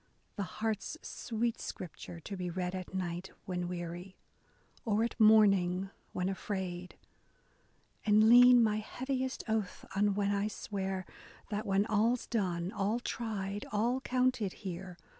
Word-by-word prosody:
The 205 - -3
heart's 215 - -3
sweet 230 0 -2
scripture, 170 -1 -7
to 200 - -6
be 180 -1 -3
read 180 +1 -2
at 185 -1 -5
night 180 0 -3 0.2
When 180 -2 -2
weary, 175 +1 -6 0.7
or 220 0 +2
at 235 - -3
morning 195 -4 +5 0.2
when 180 0 -1
afraid, 185 -2 -4 1.1
And 215 +1 +5
lean 245 +1 +9
my 215 -1 +2
heaviest 260 +4 -3
oath 220 -4 -2
on 205 0 +3
when 200 0 +1
I 200 +1 +1
swear 190 -3 -3 0.5
That, 210 +1 -2
when 195 +1 +3
all's 225 +3 +2
done, 180 -5 -1
all 210 +2 0
tried, 205 -5 -3
all 235 +5 +1
counted 255 -6 +1
here. 180 0 -5
200 Hz, 135 wpm, -32 LUFS, 185-220 Hz, 1.1 s, lean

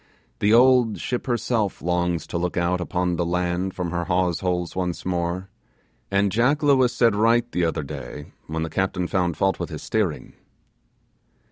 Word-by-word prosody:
The 105 - +2
old 125 -1 +5
ship 125 +1 -3
herself 115 -4 0
longs 90 -1 -1
to 85 - -3
look 90 +1 -2
out 90 +1 +1
upon 90 -1 -1
the 85 - +1
land 90 +2 -1
from 90 -2 -3
her 85 0 -2
hawse 90 -2 +1
holes 90 -2 -2
once 90 -2 -3
more, 90 +1 -2 0.6
and 100 0 +2
Jack 125 +8 +2
Lewis 130 -4 +4
said 120 -3 +3
right 115 +3 +3
the 90 - +1
other 80 -1 -1
day 75 +1 -8 0.2
when 80 0 -2
the 80 - -3
captain 95 0 -1
found 90 -4 0
fault 95 0 +1
with - - -3
his - - -7
steering. 100 -9 -2
90 Hz, 170 wpm, -23 LUFS, 85-110 Hz, 0.6 s, old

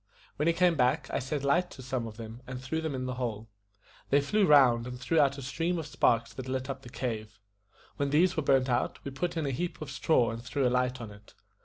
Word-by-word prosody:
When 150 - +1
he 170 - +4
came 180 0 +4
back, 125 -3 +1
I - - 0
set 135 +2 -3
light 175 +6 +2
to 130 - -11
some 125 -2 -2
of 110 -1 -10
them, 115 +1 -8
and 130 -1 -5
threw 130 +5 -3
them 160 -4 -3
in 130 0 -3
the 130 - -2
hole. 110 -2 -3 0.6
They 140 - +5
flew 195 +8 +2
round, 125 -5 +5
and 125 0 -7
threw 155 +6 +1
out 140 -1 +3
a 140 - -7
stream 165 +7 -1
of 160 - -4
sparks 115 -5 +1
that 130 +3 -7
lit 130 +1 -2
up 135 0 -7
the 125 - -11
cave. 110 -3 -4 0.6
When 140 0 0
these 170 +6 +3
were 155 - +1
burnt 135 -2 +3
out, 125 -1 0
we 140 - -4
put 170 +5 -3
in 160 - 0
a 140 - -1
heap 170 +7 -3
of 155 -3 -6
straw 135 -4 +2
and 115 0 -6
threw 130 +1 0
a - - +1
light 125 0 +1
on 110 -2 -7
it. 105 +1 -16
130 Hz, 260 wpm, -29 LUFS, 120-150 Hz, 0.6 s, They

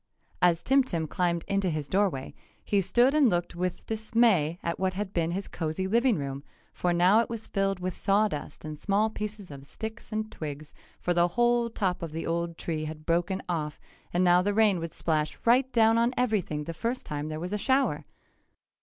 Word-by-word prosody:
As 175 -2 +3
Tim 270 +1 +4
Tim 170 -10 -2
climbed 170 0 -1
into 195 -2 +1
his 155 -3 -3
doorway, 185 -9 0 0.3
he 200 -1 +2
stood 240 +9 +3
and 295 -5 +5
looked 175 -2 -1
with 180 0 -3
dismay 220 -7 +2
at 170 - -2
what 185 0 0
had 200 0 -4
been 165 -1 0
his 190 +3 -3
cozy 160 +2 -3
living 235 +2 +3
room, 140 -1 -4 0.3
for 180 - 0
now 180 +5 +5
it 230 - 0
was 230 -1 -5
filled 195 -1 -1
with 180 0 -3
sawdust 195 -8 0
and 155 -1 -6
small 210 +2 +1
pieces 210 -4 -6
of 140 -1 -9
sticks 220 +11 -8
and 215 0 -3
twigs, 150 -1 -7 0.3
for 175 - 0
the 175 0 +4
whole 240 +5 +2
top 190 -5 -1
of 165 -2 -5
the 165 - -4
old 170 0 -2
tree 155 -2 -3
had 155 0 -7
broken 175 +3 0
off 155 -4 -3 0.3
and 175 +1 +2
now 180 0 +5
the 200 +2 0
rain 210 -4 +4
would 165 0 -5
splash 155 -2 -1
right 255 +3 +4
down 225 -1 +4
on 235 +2 +1
everything 205 -11 0
the 165 - -5
first 235 +9 -3
time 150 0 -4
there 155 0 -4
was 180 +4 -4
a 210 - -1
shower. 265 +5 +1
185 Hz, 200 wpm, -28 LUFS, 165-220 Hz, 0.3 s, and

